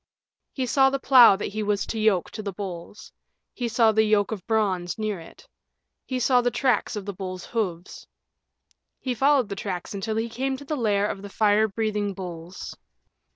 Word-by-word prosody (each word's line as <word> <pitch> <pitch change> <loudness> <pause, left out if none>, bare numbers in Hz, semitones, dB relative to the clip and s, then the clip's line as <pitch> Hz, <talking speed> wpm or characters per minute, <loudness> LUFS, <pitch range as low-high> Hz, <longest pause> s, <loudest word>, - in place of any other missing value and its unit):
He 260 - -2
saw 270 +2 +4
the 275 - -1
plow 255 -6 +7
that 195 - -4
he 215 - -2
was 205 -1 0
to 225 - -4
yoke 215 -5 +2
to 215 - -6
the 205 -1 -4
bulls; 185 0 -8 0.4
he 245 - -3
saw 225 -1 +4
the 220 0 +3
yoke 210 -1 +2
of 200 -5 -6
bronze 195 -6 0
near 215 -3 -2
it; 165 - -15 0.6
he 255 -1 -2
saw 250 0 +4
the 245 - +1
tracks 245 -2 0
of 205 -2 -5
the 200 - -4
bulls' 185 -1 -6
hooves. 185 -7 -4 0.9
He 255 - -2
followed 270 0 +3
the 200 - -4
tracks 190 -2 -5
until 215 +2 -3
he 225 +1 -1
came 265 +3 -2
to 285 - -11
the 305 - -2
lair 205 -6 +1
of 195 - -5
the 200 - -8
fire 210 +1 +3
breathing 210 -1 -2
bulls. 175 -1 -8
215 Hz, 195 wpm, -25 LUFS, 195-240 Hz, 0.9 s, plow